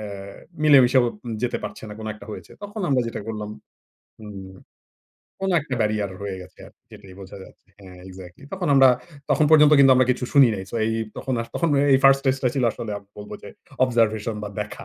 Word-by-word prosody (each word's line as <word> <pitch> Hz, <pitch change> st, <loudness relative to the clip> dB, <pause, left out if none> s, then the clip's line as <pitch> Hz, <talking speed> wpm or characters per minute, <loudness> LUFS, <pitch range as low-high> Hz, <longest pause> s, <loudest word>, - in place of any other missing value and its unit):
আ -, -, -7 dB, 0.6 s
মিলেমিশেও 130 Hz, -4 st, +5 dB, 0.4 s
যেতে 120 Hz, -, -1 dB
পারছে -, -, -8 dB
না 105 Hz, -, -8 dB
কোন 110 Hz, -, -7 dB
একটা 105 Hz, -, -14 dB
হয়েছে। -, -, -10 dB
তখন 205 Hz, +1 st, -7 dB
আমরা 135 Hz, -3 st, +2 dB
যেটা 115 Hz, -, -5 dB
করলাম 105 Hz, -1 st, -5 dB, 0.7 s
হুম 100 Hz, -3 st, -10 dB, 0.9 s
কোন 195 Hz, -, -1 dB
একটা 140 Hz, -3 st, -5 dB
ব্যারিয়ার 105 Hz, -2 st, 0 dB
রয়ে 95 Hz, -2 st, -5 dB
গেছে 90 Hz, -, -17 dB
আর -, -, -17 dB, 0.2 s
যেটাই 95 Hz, -2 st, -14 dB
বোঝা 95 Hz, +1 st, -11 dB
যাচ্ছে 95 Hz, -, -20 dB
হ্যাঁ 90 Hz, -2 st, -13 dB
exactly 90 Hz, +4 st, -13 dB
তখন 180 Hz, -4 st, -3 dB
আমরা 135 Hz, -1 st, +7 dB, 0.4 s
তখন 155 Hz, -, +3 dB
পর্যন্ত 150 Hz, -1 st, +6 dB
কিন্তু 135 Hz, -1 st, +7 dB
আমরা 130 Hz, -1 st, +3 dB
কিছু 125 Hz, 0 st, -1 dB
শুনি 140 Hz, -4 st, +6 dB
নাই। 95 Hz, -1 st, -6 dB
সো -, -, -9 dB
এই 110 Hz, -, -1 dB
এই 110 Hz, -, -2 dB
তখন 130 Hz, -, -3 dB
আ -, -, -1 dB
তখন 170 Hz, -, 0 dB, 0.2 s
এই 130 Hz, -, +5 dB
1st 135 Hz, 0 st, +7 dB
stage 135 Hz, -1 st, +1 dB
টা 125 Hz, -, +3 dB
ছিল 130 Hz, -3 st, 0 dB
আসলে 105 Hz, -, -7 dB
আ -, -, -16 dB, 0.2 s
বলব 105 Hz, -, -10 dB
যে -, -, -10 dB, 0.4 s
অবজারভেশন 115 Hz, -3 st, 0 dB
বা 105 Hz, -, -5 dB
দেখা। 105 Hz, 0 st, -7 dB
115 Hz, 205 wpm, -23 LUFS, 105-135 Hz, 0.9 s, আমরা